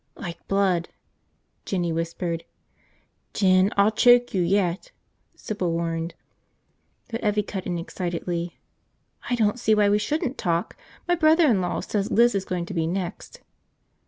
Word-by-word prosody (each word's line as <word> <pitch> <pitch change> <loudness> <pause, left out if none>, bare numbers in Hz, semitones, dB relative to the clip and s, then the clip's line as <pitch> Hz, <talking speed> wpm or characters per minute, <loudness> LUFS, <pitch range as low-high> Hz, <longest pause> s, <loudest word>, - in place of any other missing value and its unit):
"Like 170 -1 -8
blood," 190 -4 +1 0.7
Jinny 175 -4 -1
whispered. 165 0 -3 0.9
"Jin, 185 0 +4
I'll 200 +2 +5
choke 245 +2 +5
you 190 - +1
yet!" 185 - 0 0.4
Sybil 190 -5 -3
warned. 165 0 -2 1.0
But 230 - -3
Evvie 210 -1 +1
cut 190 -3 -5
in 175 -1 -2
excitedly. 170 0 -4 0.7
"I 245 - +2
don't 220 0 +1
see 220 -2 +3
why 205 -1 +4
we 205 +1 +3
shouldn't 295 +3 -2
talk! 170 -3 -1 0.3
My 350 - +3
brother 325 0 +4
in 225 -10 +3
law 180 - -2
says 205 0 -2
Liz 240 +1 +4
is 195 -1 -1
going 180 -2 -3
to 185 - -7
be 165 -2 0
next." 180 0 -5
190 Hz, 145 wpm, -24 LUFS, 170-215 Hz, 1.0 s, I'll